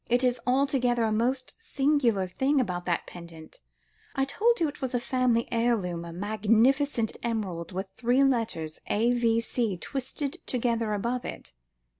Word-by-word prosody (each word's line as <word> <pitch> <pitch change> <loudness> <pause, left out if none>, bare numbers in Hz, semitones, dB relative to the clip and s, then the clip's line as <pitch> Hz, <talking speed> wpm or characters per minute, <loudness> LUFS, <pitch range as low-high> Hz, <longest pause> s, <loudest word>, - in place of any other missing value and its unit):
It 245 +2 +3
is 250 -1 +2
altogether 255 -2 +2
a 220 - +1
most 255 +4 0
singular 275 - +1
thing 265 +10 +1
about 180 -7 -2
that 170 -1 0
pendant. 170 -2 -11 0.6
I 270 -1 +2
told 460 +11 +2
you 330 - +2
it 290 -1 -8
was 260 -1 -2
a - - +2
family 245 -2 +1
heirloom, 215 -8 0
a 170 - -7
magnificent 220 - +2
emerald 200 -8 -3
with 190 +2 -3
three 250 +3 +3
letters 225 - 0
A.V.C. 230 -2 +1
twisted 270 - -4
together 230 -3 0
above 240 +4 -2
it." - - -7
235 Hz, 145 wpm, -28 LUFS, 205-260 Hz, 0.6 s, It